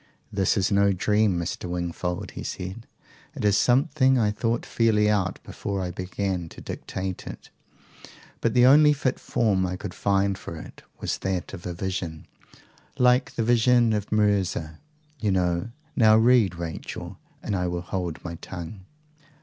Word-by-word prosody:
"This 100 Hz, +1 st, +2 dB
is 100 Hz, +2 st, +1 dB
no 100 Hz, 0 st, +4 dB
dream, 105 Hz, 0 st, +2 dB
Mr. 85 Hz, +1 st, -4 dB
Wingfold," 90 Hz, 0 st, -3 dB
he -, -, -7 dB
said. 95 Hz, +5 st, -6 dB, 0.5 s
"It -, -, -3 dB
is 105 Hz, -1 st, +4 dB
something 130 Hz, -, +3 dB
I 105 Hz, -3 st, +2 dB
thought 115 Hz, +2 st, -1 dB
fairly 110 Hz, -2 st, +2 dB
out 100 Hz, -3 st, +1 dB
before 100 Hz, -1 st, -4 dB
I 90 Hz, -1 st, -2 dB
began 90 Hz, -1 st, -3 dB
to -, -, -12 dB
dictate 95 Hz, -1 st, -5 dB
it. -, -, -9 dB, 0.9 s
But 115 Hz, 0 st, 0 dB
the 125 Hz, 0 st, +6 dB
only 150 Hz, +3 st, +7 dB
fit 135 Hz, -3 st, -1 dB
form 100 Hz, -5 st, +1 dB
I 90 Hz, 0 st, -2 dB
could 95 Hz, 0 st, -6 dB
find 100 Hz, -1 st, +1 dB
for 85 Hz, -, -7 dB
it -, -, -11 dB, 0.2 s
was -, -, -2 dB
that 95 Hz, -3 st, -3 dB
of 90 Hz, -2 st, -7 dB
a 90 Hz, -, -3 dB
vision 85 Hz, -4 st, -4 dB, 0.7 s
like 125 Hz, +1 st, +3 dB
the 115 Hz, -, 0 dB
Vision 120 Hz, 0 st, +4 dB
of 105 Hz, -1 st, -3 dB
Mirza, 100 Hz, -7 st, +1 dB, 0.4 s
you 105 Hz, -3 st, 0 dB
know. 90 Hz, +1 st, 0 dB, 0.3 s
Now 110 Hz, -2 st, +6 dB
read, 115 Hz, -5 st, +4 dB
Rachel, 85 Hz, -2 st, -6 dB, 0.2 s
and 100 Hz, -, -2 dB
I 90 Hz, -1 st, 0 dB
will 90 Hz, 0 st, -2 dB
hold 90 Hz, -2 st, -4 dB
my 85 Hz, -, -4 dB
tongue." 90 Hz, +2 st, -7 dB
100 Hz, 160 wpm, -25 LUFS, 90-115 Hz, 0.9 s, only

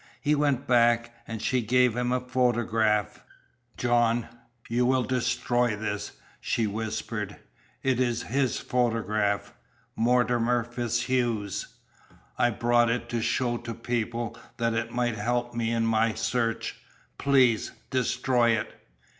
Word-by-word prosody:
He 150 Hz, -1 st, +1 dB
went 145 Hz, -3 st, +1 dB
back, 120 Hz, -1 st, +3 dB
and 110 Hz, -1 st, -5 dB
she 130 Hz, -1 st, +1 dB
gave 125 Hz, +1 st, +3 dB
him 125 Hz, 0 st, 0 dB
a 125 Hz, -, +2 dB
photograph. 120 Hz, -4 st, +1 dB, 0.5 s
"John, 120 Hz, -1 st, +2 dB, 0.4 s
you 120 Hz, +2 st, +1 dB
will 130 Hz, 0 st, +3 dB
destroy 120 Hz, -2 st, 0 dB
this," 105 Hz, -1 st, -4 dB, 0.3 s
she 115 Hz, -, 0 dB
whispered. 110 Hz, +1 st, -3 dB, 0.5 s
"It 130 Hz, -2 st, +1 dB
is 120 Hz, -2 st, 0 dB
his 130 Hz, +1 st, 0 dB
photograph 110 Hz, -3 st, 0 dB, 0.4 s
Mortimer 120 Hz, 0 st, +2 dB
FitzHugh's. 120 Hz, -3 st, -1 dB, 0.7 s
I 120 Hz, -, +3 dB
brought 120 Hz, +1 st, +2 dB
it 120 Hz, 0 st, -2 dB
to 120 Hz, -1 st, -1 dB
show 120 Hz, +1 st, 0 dB
to 115 Hz, -1 st, -6 dB
people, 115 Hz, 0 st, -2 dB, 0.2 s
that 115 Hz, -2 st, 0 dB
it 115 Hz, +1 st, -1 dB
might 120 Hz, -2 st, -1 dB
help 120 Hz, +3 st, -1 dB
me 115 Hz, -1 st, -1 dB
in 115 Hz, -1 st, +1 dB
my 115 Hz, 0 st, +2 dB
search. 115 Hz, 0 st, -1 dB, 0.4 s
Please 130 Hz, -5 st, +3 dB, 0.2 s
destroy 125 Hz, -2 st, +2 dB
it!" -, -, -6 dB
120 Hz, 125 wpm, -27 LUFS, 115-125 Hz, 0.7 s, back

